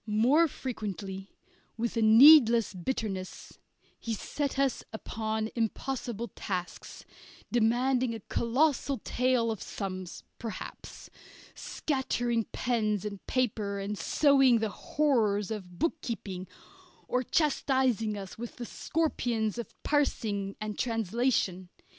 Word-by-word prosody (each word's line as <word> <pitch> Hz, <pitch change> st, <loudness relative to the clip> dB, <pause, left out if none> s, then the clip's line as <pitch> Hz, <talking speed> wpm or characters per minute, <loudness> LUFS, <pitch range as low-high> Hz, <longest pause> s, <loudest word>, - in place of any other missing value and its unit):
More 250 Hz, +10 st, +4 dB
frequently, 195 Hz, -, -5 dB, 0.5 s
with 235 Hz, +1 st, -2 dB
a 230 Hz, -, +1 dB
needless 235 Hz, 0 st, +8 dB
bitterness, 190 Hz, -1 st, -4 dB, 0.4 s
he 230 Hz, -1 st, -3 dB
set 280 Hz, +6 st, -3 dB
us 275 Hz, -2 st, +1 dB
upon 220 Hz, 0 st, -3 dB
impossible 235 Hz, 0 st, -3 dB
tasks, 180 Hz, -2 st, -6 dB, 0.5 s
demanding 245 Hz, +1 st, +2 dB
a -, -, -6 dB
colossal 270 Hz, +5 st, +1 dB
tale 250 Hz, -2 st, +1 dB
of 220 Hz, -, -5 dB
sums 185 Hz, -3 st, -6 dB, 0.2 s
perhaps, 225 Hz, -2 st, -8 dB, 0.4 s
scattering 245 Hz, -5 st, -1 dB
pens 215 Hz, -5 st, -1 dB
and 200 Hz, -2 st, -6 dB
paper 215 Hz, -5 st, 0 dB
and 200 Hz, +1 st, -3 dB
sowing 270 Hz, +1 st, +4 dB
the 220 Hz, -1 st, -1 dB
horrors 220 Hz, -7 st, +1 dB
of 185 Hz, -5 st, -6 dB
bookkeeping, 215 Hz, -, -3 dB, 0.6 s
or 250 Hz, -, +1 dB
chastising 260 Hz, -, +1 dB
us 195 Hz, +1 st, -8 dB
with 240 Hz, 0 st, -6 dB
the 245 Hz, -, -6 dB
scorpions 240 Hz, -9 st, -1 dB
of 235 Hz, -, -6 dB
parsing 210 Hz, -9 st, 0 dB
and 215 Hz, -1 st, -5 dB
translation. 225 Hz, -5 st, 0 dB
230 Hz, 105 wpm, -29 LUFS, 210-255 Hz, 0.6 s, needless